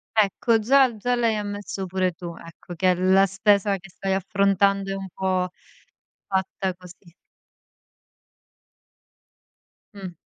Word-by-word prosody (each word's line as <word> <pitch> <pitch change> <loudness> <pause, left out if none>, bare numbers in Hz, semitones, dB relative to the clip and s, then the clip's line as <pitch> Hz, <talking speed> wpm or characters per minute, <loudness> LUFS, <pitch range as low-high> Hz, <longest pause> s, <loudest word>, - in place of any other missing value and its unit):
Ecco, 220 +2 +2
già 255 +2 +4
già 245 +4 0
l'hai 230 -2 +1
ammesso 205 -2 -5
pure 185 0 -1
tu, 170 0 -8
ecco, 165 +1 -12
che 185 +1 +3
la 190 +2 +4
spesa 200 +1 +2
che 185 0 -15
stai 190 +2 -3
affrontando, 195 0 +1
è - - -2
un 195 0 -6
po' 185 -1 -1 0.8
fatta 190 0 -2
così. 180 -1 -16 2.8
Mh. 190 -4 -9
195 Hz, 115 wpm, -24 LUFS, 185-205 Hz, 2.8 s, già